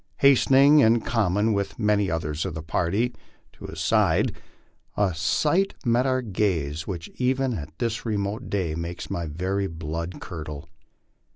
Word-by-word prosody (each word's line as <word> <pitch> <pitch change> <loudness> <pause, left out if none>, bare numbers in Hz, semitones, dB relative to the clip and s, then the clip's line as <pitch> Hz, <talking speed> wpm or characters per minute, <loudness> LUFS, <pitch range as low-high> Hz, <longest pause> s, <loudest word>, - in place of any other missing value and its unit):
Hastening, 140 +2 +6
in 115 -3 +5
common 105 -1 +1
with 100 -1 -2
many 105 -3 +2
others 80 -1 -2
of 95 -4 -4
the 80 - -5
party, 100 +9 0 0.4
to - - -12
his - - -8
side, - - +2 0.6
a 100 -3 +2
sight 150 - +1
met 120 +2 +3
our 130 -1 +1
gaze 85 -8 -1
which 85 -4 -5
even 130 0 +1
at 75 -5 -7
this 115 -2 -2
remote 105 +1 -2
day 90 -6 -1
makes 85 +2 -5
my 85 -1 -2
very 95 +6 -2
blood 80 +1 -5
curdle. 80 -4 -7
100 Hz, 150 wpm, -25 LUFS, 80-115 Hz, 0.6 s, Hastening